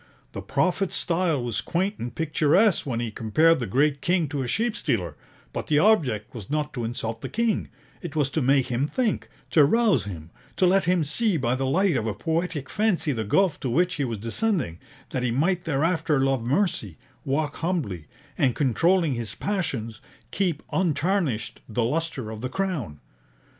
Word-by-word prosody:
The - - -6
prophet's 185 +1 0
style 165 -6 0
was 120 -3 -1
quaint 190 +4 -1
and 120 +1 -5
picturesque 160 +4 +3
when 115 -4 -1
he 120 -2 -3
compared 155 +10 +3
the 120 - -3
great 140 +6 +2
king 175 -2 +1
to 145 -1 -2
a 125 - -2
sheep 230 - 0
stealer; 90 - -1 0.4
but - - -4
the 150 - +3
object 145 - +2
was 110 -5 -8
not 150 0 -1
to 120 - -3
insult 115 -1 -4
the - - -5
king, 230 -1 0 0.3
it 170 -4 -7
was 145 -3 +1
to 155 - 0
make 135 0 +3
him 130 +3 -1
think, 240 +3 -1 0.2
to 155 - +6
rouse 220 - +3
him; 85 -5 -8 0.3
to 185 - +4
let 190 +1 +3
him 175 -1 +2
see 190 +6 +1
by 125 -4 0
the 130 +1 -1
light 185 +6 +2
of 115 - -1
a 105 - -2
poetic 160 - -2
fancy 190 -7 +1
the 115 -5 -2
gulf 165 - +2
to 130 - -3
which 175 +8 +2
he 145 - 0
was 115 -4 -2
descending, 115 - -1 0.3
that 130 - -1
he 125 - 0
might 175 +9 +1
thereafter 160 -1 +1
love 135 -3 +1
mercy, 120 - 0 0.3
walk 145 +1 -1
humbly, 145 - -2 0.3
and, 130 -3 +3
controlling 165 +4 +2
his 115 -3 -5
passions, 135 - -3 0.3
keep 175 -6 -1
untarnished 150 - 0
the 115 +2 0
lustre 140 -3 -2
of 110 -1 -7
the 130 - -3
Crown. 150 - -3
145 Hz, 185 wpm, -25 LUFS, 120-180 Hz, 0.4 s, to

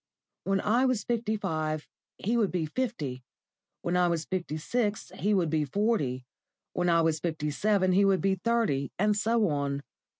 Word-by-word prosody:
When 195 0 +1
I 235 +5 +3
was 255 -5 +1
fifty 230 -2 -1
five 155 -4 -2 0.3
he 225 +5 -1
would 220 -5 +2
be 175 -3 -1
fifty; 155 - -3 0.6
when 175 - 0
I 180 0 +4
was 165 -2 -1
fifty 175 -5 -3
six 210 +5 -1
he 205 +1 +1
would 170 -5 +1
be 155 -1 +2
forty; 145 - 0 0.5
when 175 0 +1
I 165 -1 +4
was 160 -1 +1
fifty 155 -2 -2
seven 195 +3 +2
he 195 +2 +4
would 195 -2 +4
be 195 0 +2
thirty, 190 - 0
and 210 +2 +2
so 225 +1 +2
on. 140 -1 -1
185 Hz, 175 wpm, -29 LUFS, 155-215 Hz, 0.6 s, I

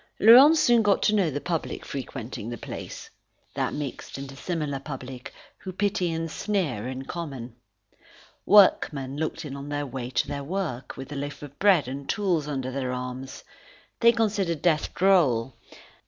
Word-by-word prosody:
Laurent 260 +9 +9
soon 240 -6 +5
got 205 -2 +2
to 210 - +3
know 195 -6 +3
the 145 0 -3
public 165 +1 -3
frequenting 120 -4 -6
the 120 - -5
place, - - -8 0.5
that - - -1
mixed 145 -2 -6
and 140 0 -6
dissimilar 145 0 -3
public 130 -2 -8 0.3
who 190 - -7
pity 185 -2 0
and 165 0 -3
sneer 160 - -2
in 130 +1 -5
common. 135 -9 -6 0.9
Workmen 150 -9 +4
looked 160 +1 -3
in 140 -2 -6
on 140 +1 -7
their 145 0 -2
way 130 -2 -5
to - - 0
their 140 -1 -4
work, 155 -6 -4
with 135 +1 -8
a - - -5
loaf 140 +1 -5
of 145 -1 -11
bread 195 -9 +4
and 135 +2 -6
tools 180 -8 0
under 130 -3 -3
their 130 -1 -2
arms. 125 +1 -6 0.6
They 235 0 +7
considered 200 -8 0
death 160 -4 +2
droll. 145 -11 +3
145 Hz, 165 wpm, -26 LUFS, 130-185 Hz, 0.9 s, Laurent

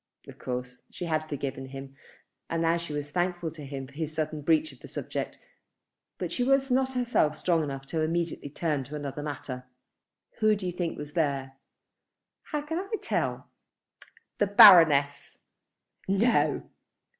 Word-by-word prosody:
Of - - -12
course 125 0 -5
she 180 - -6
had 155 -1 -1
forgiven 135 -2 -4
him 135 0 -9 0.5
and 165 0 0
now 165 +1 +3
she 170 -2 -6
was 145 0 -4
thankful 175 -1 -1
to 155 -2 -10
him 135 -1 -6
for 135 - -16
his 155 +1 -3
sudden 155 -1 -3
breach 155 0 +2
of 130 - -17
the - - -11
subject; - - -5 0.8
but 180 -3 -4
she 245 - 0
was 270 +1 +2
not 265 +1 +2
herself 240 -12 +1
strong 170 -1 +2
enough 135 -1 -6
immediately 165 -1 -1
to 145 - -25
turn 150 -5 0
to 150 - -8
another 145 -1 -5
matter. 135 -3 -6 0.7
"Who 215 -1 +4
do 200 -2 -6
you 180 - -1
think 175 -1 -3
was 145 0 -7
there?" 140 -5 -1 0.9
"How 300 -1 -3
can 320 +3 -3
I 390 +3 -7
tell?" - - -2 0.9
"The 205 - +3
Baroness." 165 -9 +7 0.7
"No?" 205 +5 +2
155 Hz, 160 wpm, -28 LUFS, 140-180 Hz, 0.9 s, Baroness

